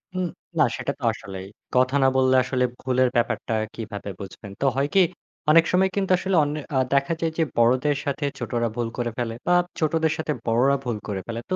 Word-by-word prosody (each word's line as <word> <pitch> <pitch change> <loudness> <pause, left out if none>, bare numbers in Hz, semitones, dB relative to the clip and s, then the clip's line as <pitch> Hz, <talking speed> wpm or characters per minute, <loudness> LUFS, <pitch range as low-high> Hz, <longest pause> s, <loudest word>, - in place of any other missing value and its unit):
হুম, 185 -1 0 0.3
না - - +7
সেটা - - -2
তো - - -13
আসলেই। 95 -1 -8 0.3
কথা 130 +2 +3
না - - +6
বললে 130 0 +4
আসলে 125 0 0 0.2
ভুলের 130 -1 +2
ব্যাপারটা 115 -1 0 0.2
কিভাবে 105 -3 -6
বুঝবেন? 100 +1 -9
তো 140 - +2
হয়কি 145 +8 +3 0.5
অনেক 165 +2 +7
সময় 190 +1 +3
কিন্তু 195 -2 0
আসলে 190 +1 -1
অন্যে 150 +1 -2
আ - - +3 0.2
দেখা 140 +4 +2
যায় 165 -1 +1
যে 165 - +3
বড়দের 130 +5 +3
সাথে 145 +1 -1
ছোটরা 120 -1 -1
ভুল 120 -2 -1
করে 120 -1 -1
ফেলে 120 -2 -2
বা 175 - +4 0.3
ছোটদের 160 0 +1
সাথে 160 -1 -2
বড়রা 125 +5 +3
ভুল 120 -4 -2
করে 95 -2 -3
ফেলে। 115 0 -4
তো - - +3
130 Hz, 195 wpm, -24 LUFS, 115-155 Hz, 0.5 s, না